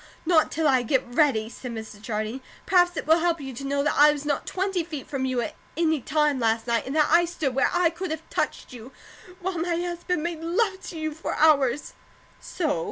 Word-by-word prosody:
"Not 320 -2 +3
till 320 -1 +1
I 260 -3 +4
get 255 +2 +1
ready," 245 -3 +2
said 240 +1 -8
Mrs. 220 -2 -8
Jardine. 215 +3 -3 0.2
"Perhaps 355 -2 +3
it - - -3
will 320 +2 +5
help 335 0 +1
you 270 -2 -7
to 245 - -8
know 280 +1 0
that 295 - +1
I 295 +1 +7
was 295 0 -5
not 290 -1 -1
twenty 380 -2 -1
feet 310 -5 -7
from 270 -2 -2
you 255 -2 0
at 230 - -4 0.2
any 320 -3 +1
time 300 0 +1
last 225 -1 +1
night; 235 0 0
and 270 - -4
that 305 -1 +3
I 345 0 +6
stood 330 -6 -2
where 265 - +2
I 350 -2 +2
could 360 +2 -5
have 315 +1 -5
touched - - -2
you, 245 +1 -10 0.5
while 360 -1 -2
my 340 0 -1
husband 350 -1 -2
made 340 -2 -3
love 380 +3 0
to 335 - -7
you 315 -1 -3
for 320 - -4
hours." 285 -4 +3 0.5
"So?" 310 - -2
300 Hz, 225 wpm, -25 LUFS, 260-340 Hz, 0.5 s, I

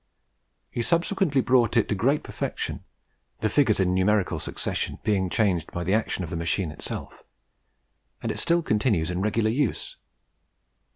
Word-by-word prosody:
He 120 - -2
subsequently 170 - +2
brought 120 -2 +3
it 115 - +3
to - - +2
great 130 +9 +1
perfection - - -4 0.6
the 110 - +2
figures 115 -6 +3
in 90 -1 +2
numerical 95 +1 +2
succession - - -3
being 95 -3 +1
changed 90 -6 +1
by 85 - -3
the 95 +3 0
action 110 -4 0
of 90 - -6
the - - -3
machine 85 0 -1
itself, 75 - -6 1.0
and - - -1
it - - -3
still 170 0 +2
continues 105 - +1
in 90 +1 -2
regular 110 +2 +1
use. 130 -2 -1
105 Hz, 155 wpm, -26 LUFS, 95-125 Hz, 1.0 s, brought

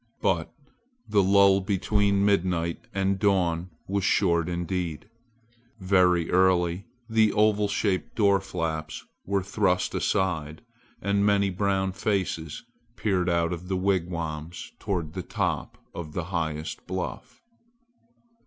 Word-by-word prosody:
But 85 -4 0 0.6
the 105 - +3
lull 100 0 +5
between 100 0 +1
midnight 90 -4 0
and 95 0 0
dawn 90 -3 +1 0.2
was 100 0 -1
short 85 -3 +2
indeed. 85 -1 -3 0.7
Very 90 -3 +3
early 90 0 +2 0.2
the 110 -2 +3
oval 105 -1 +3
shaped 100 -2 -1
door 100 -3 +4
flaps 80 -4 -4 0.2
were 100 -1 0
thrust 95 -2 0
aside 80 -4 -1 0.4
and 100 0 +2
many 100 -1 +3
brown 95 0 0
faces 95 -6 -2 0.3
peered 95 -4 0
out 85 0 +1
of 90 +1 -7
the 95 0 -1
wigwams 85 -4 -2
toward 85 -6 -3
the 95 - -4
top - - -2 0.2
of 75 -3 -7
the 90 - -2
highest 80 -2 -3
bluff. 95 - -5
95 Hz, 115 wpm, -26 LUFS, 85-100 Hz, 0.7 s, lull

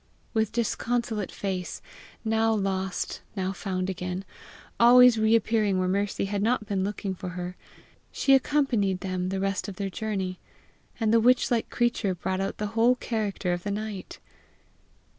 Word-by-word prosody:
With 220 -2 +1
disconsolate 235 -2 -1
face, 185 -3 -4 0.5
now 225 0 +2
lost, 190 -2 -2
now 190 -1 -1
found 185 -1 -3
again, 185 0 -4 0.5
always 245 0 +8
reappearing 220 -2 +3
where 185 0 +1
Mercy 200 +1 0
had 200 0 -2
not 225 0 +1
been 195 -2 -1
looking 200 -1 -3
for 180 0 -6
her, 180 0 -4 0.6
she 275 - +3
accompanied 255 -9 +2
them 185 -1 -2
the 190 0 -2
rest 195 +1 -1
of 200 - -6
their 195 0 -3
journey, 190 -4 -3 0.6
and 225 -1 +2
the 230 - +6
witch 250 +3 +3
like 230 -2 +1
creature 235 -5 0
brought 185 +2 -2
out 195 - -3
the 210 0 -4
whole 235 +2 +4
character 210 -6 -2
of 175 - -3
the 205 - -4
night. 205 -2 -5
200 Hz, 155 wpm, -27 LUFS, 190-225 Hz, 0.6 s, always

